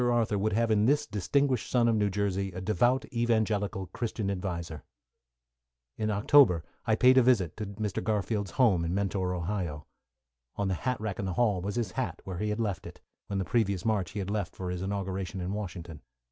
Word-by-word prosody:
Arthur 115 -4 +1
would 110 +1 0
have 115 +1 +2
in 105 +1 +3
this 145 +2 +3
distinguished 125 +3 0
son 120 -2 +3
of 115 - +3
New 105 -1 +2
Jersey, 100 -1 -1
a 95 - -5
devout, 120 +7 +2
evangelical, 110 -4 0
Christian 110 -4 -2
adviser. 85 -5 -4 1.1
In 110 0 -1
October 105 - +5 0.2
I 110 - +4
paid 130 +3 +6
a - - +6
visit, 115 -10 +2
to 105 -1 -4
Mr. 100 -1 -3
Garfield's 105 -1 -1
home 105 -10 +4
in 85 +2 -1
Mentor, 95 -2 -1
Ohio. 85 -4 -3 0.7
On 100 -1 -1
the - - +1
hat 125 +6 -2
rack 105 -3 -4
in 100 - -2
the 95 - -2
hall 105 -4 +2
was 100 +4 -3
his 115 -6 -1
hat, - - -3
where 95 -2 -5
he 105 - -1
had 105 +2 -2
left 100 -6 -2
it, - - -12 0.3
when 100 - -2
the 95 - -1
previous 100 -6 0
March 105 -5 +1
he 100 - -2
left 100 -1 -3
for 90 -1 -4
his 90 0 -4
inauguration 95 0 -3
in 90 +2 -3
Washington. 90 -6 -6
100 Hz, 200 wpm, -29 LUFS, 95-110 Hz, 1.1 s, paid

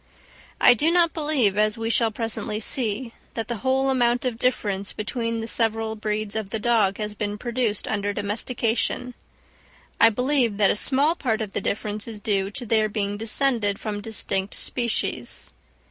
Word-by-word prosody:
I - - +8
do 295 +7 +1
not 340 -1 +3
believe, 280 - +1
as 215 0 +2
we 225 0 -1
shall 230 -1 +4
presently 220 -1 -3
see, 230 0 -1 0.2
that 225 0 -4
the 235 - -2
whole 265 +3 +1
amount 245 -1 +2
of 235 -3 -2
difference 205 -6 -1
between 230 +1 -3
the 225 - -5
several 225 -1 0
breeds 215 0 -3
of 220 -3 -3
the 220 - -2
dog 215 -3 +2
has 210 -1 -3
been 210 0 -3
produced 235 -2 -2
under 205 -1 -1
domestication; 230 +4 -1 0.9
I 230 - +8
believe 250 -1 +1
that 205 -2 +4
a - - 0
small 275 +8 +3
part 240 -9 -1
of 215 -3 -4
the - - -1
difference 210 +2 -2
is 220 -2 -7
due 195 -2 0
to 240 +5 -6
their 220 -1 +2
being 205 -1 -2
descended 225 -1 +1
from 210 -2 -4
distinct 205 -2 -2
species. 235 - -2
225 Hz, 170 wpm, -24 LUFS, 210-245 Hz, 0.9 s, I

